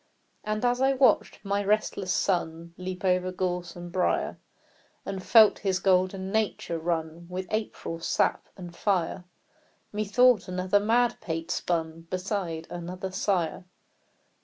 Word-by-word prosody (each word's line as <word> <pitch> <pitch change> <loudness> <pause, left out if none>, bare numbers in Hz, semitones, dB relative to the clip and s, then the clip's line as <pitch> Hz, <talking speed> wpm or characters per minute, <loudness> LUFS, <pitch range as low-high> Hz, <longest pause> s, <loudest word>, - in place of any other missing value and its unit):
And 215 +2 -1
as 245 +1 +2
I 270 +1 +4
watched 260 -5 +2
my 200 +1 0
restless 200 -2 0
son 170 -3 -1
Leap 185 +1 -6
over 185 0 +2
gorse 180 -1 -3
and 175 0 -8
briar, 185 0 0 0.7
And 195 -1 -4
felt 220 +2 +6
his 190 -2 0
golden 190 0 +1
nature 210 -6 -1
run 165 0 -3
With 185 +1 -4
April 215 -6 -3
sap - - 0
and 175 -2 -9
fire, 185 -3 0 0.7
Methought 215 +1 +3
another 185 +2 +1
madpate 205 -7 0
spun 165 -2 -2
Beside 185 -3 -3
another 180 +2 -5
sire. 185 -3 -1
185 Hz, 125 wpm, -27 LUFS, 175-205 Hz, 0.7 s, felt